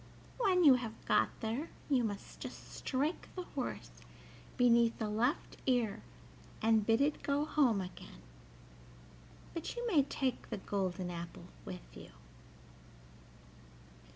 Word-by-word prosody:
When 375 -6 +4
you 285 -4 +9
have 225 -2 -7
got - - +4
there 235 +9 -2 0.2
you 265 -4 +3
must 205 -3 -5
just - - -8
strike 290 +5 -1
the 365 - -3
horse - - -5 0.6
beneath 235 -2 +5
the 220 - -2
left 235 +9 0
ear 240 -5 +2 0.6
and 220 -1 +4
bid 225 +4 +3
it 295 +2 +2
go 285 +1 +1
home 265 -10 +3
again; 180 - -9 1.3
but 335 - -4
you 480 0 -3
may 345 -11 +5
take 265 -2 -2
the - - -3
golden 190 -2 -2
apple 170 0 -7 0.2
with - - -7
you." - - -10
240 Hz, 125 wpm, -34 LUFS, 210-290 Hz, 1.3 s, you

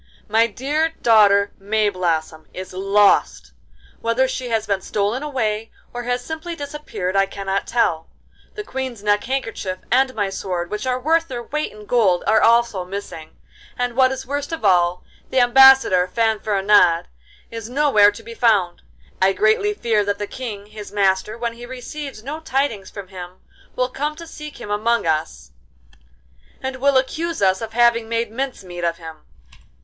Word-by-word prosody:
My 225 +2 +3
dear 295 +8 -1
daughter 205 -3 +5
Mayblossom 185 -6 -1
is 185 0 -7
lost: 195 +2 +2 0.5
whether 230 +3 +1
she 255 -1 -4
has 225 -2 0
been 200 -2 -1
stolen 210 +6 -1
away 225 -7 -2 0.2
or 245 - -4
has 245 0 -2
simply 320 +2 -5
disappeared 285 - -5
I 195 0 +3
cannot 195 0 -3
tell. 165 -9 0 0.5
The 420 - -5
Queen's 260 - -5
neck 205 0 +1
handkerchief 225 -8 -3
and 260 +1 +3
my 205 -3 -1
sword, 180 -3 -4
which 210 +4 -3
are 255 0 0
worth 325 +5 +1
their 245 -4 -5
weight 300 +5 -3
in 210 0 -13
gold, 200 -6 +2
are 220 - +4
also 230 -5 +3
missing, 180 -4 -8 0.4
and, 245 -1 -2
what 260 0 +4
is 265 0 -5
worst 285 +2 -4
of 325 -9 -4
all, 180 -2 +3 0.3
the 260 - +2
Ambassador 250 -7 +6
Fanfaronade 205 -4 +2 0.5
is 230 -1 -7
nowhere 250 -7 +4
to 205 +2 -12
be 230 - -9
found. 210 -7 +2 0.4
I 190 +1 +4
greatly 220 - +2
fear 225 - +1
that 205 0 -1
the 205 - -3
King, 210 -3 -7
his 210 0 -10
master, 200 +1 +1
when 235 0 -3
he 240 +1 -10
receives 260 -1 -7
no 295 +5 -5
tidings 270 -9 -2
from 200 -3 -9
him, 180 -2 -9 0.4
will 250 0 0
come 295 +4 -3
to 335 +1 -10
seek 300 -2 -10
him 205 - -7
among 225 +1 +1
us, 155 - -2 1.1
and 265 0 -4
will 275 +1 +3
accuse 325 +6 -1
us 190 +1 +2
of 225 0 -6
having 235 -1 +3
made 230 -1 -1
mince 260 -2 -4
meat 175 -1 -8
of 170 0 0
him. 160 -2 -11
225 Hz, 165 wpm, -21 LUFS, 195-260 Hz, 1.1 s, Ambassador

